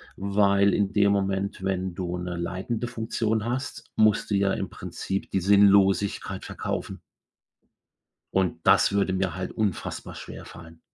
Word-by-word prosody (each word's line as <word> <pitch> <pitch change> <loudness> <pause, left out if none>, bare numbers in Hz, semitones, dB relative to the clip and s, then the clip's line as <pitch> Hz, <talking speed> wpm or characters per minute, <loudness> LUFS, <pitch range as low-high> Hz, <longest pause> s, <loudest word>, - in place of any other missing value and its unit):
weil 100 0 +3
in 100 0 0
dem 100 -1 +4
Moment, 100 -1 -1
wenn 95 -2 -2
du 90 -1 -3
'ne 90 -1 -4
leitende 95 +7 -3
Funktion 110 -2 -2
hast, 125 +3 -4
musst 110 -1 +3
du - - +3
ja 100 0 +2
im 95 - -3
Prinzip 95 +3 -5
die 95 - 0
Sinnlosigkeit 100 0 +3
verkaufen - - -5 1.3
und 95 -2 0
das - - +5
würde 100 -2 +1
mir 95 -3 -1
halt 95 0 -5
unfassbar 105 -6 -3
schwerfallen. 80 0 -11
100 Hz, 135 wpm, -26 LUFS, 95-100 Hz, 1.3 s, das